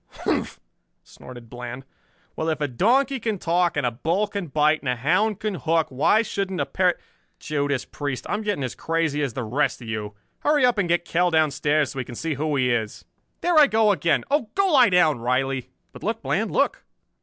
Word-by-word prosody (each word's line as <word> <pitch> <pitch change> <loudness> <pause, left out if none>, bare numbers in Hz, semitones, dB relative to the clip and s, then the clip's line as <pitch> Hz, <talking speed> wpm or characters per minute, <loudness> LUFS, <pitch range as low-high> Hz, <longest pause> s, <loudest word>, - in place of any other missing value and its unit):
"Humph!" - - -1 0.4
snorted 120 -2 -13
Bland, 125 +2 -8 0.5
"Well, 160 - -2
if 160 - -1
a 145 - 0
donkey 255 - +2
can 220 -2 -2
talk, 175 -1 +1
and 145 - 0
a 120 - +1
bull 165 - 0
can 200 -3 -5
bite, 150 +2 +2
and 130 - -4
a 125 - +1
hound 185 - +1
can 215 -1 -2
hook, 165 -2 0
why 150 - +3
shouldn't 195 -4 -3
a 140 - +1
parrot 180 +5 +1 0.4
Judas 145 -3 -2
Priest, 145 -3 -5
I'm 210 - -2
getting 205 -9 -2
as 125 - -3
crazy 165 -3 -1
as 135 -5 -2
the 130 - -4
rest 135 +7 0
of 120 - -10
you! 105 -2 -5 0.2
Hurry 295 -3 +3
up 245 -4 +2
and 175 -4 0
get 175 0 +1
Kell 175 +2 +1
downstairs 155 -2 +1
so - - -10
we - - -1
can 120 - -10
see 160 +5 -2
who 150 +1 -1
he 125 -2 +2
is. 110 -3 -3 0.4
There 345 -2 +4
I 295 - +7
go 220 -4 +3
again! 170 -4 +1
Oh, 280 -7 +1
go 390 -1 +2
lie 255 -7 +6
down, 160 -7 +3
Riley." 130 +2 -1 0.2
"But - - -13
look, - - -3
Bland, - - 0
look!" - - 0
155 Hz, 210 wpm, -23 LUFS, 130-200 Hz, 0.5 s, I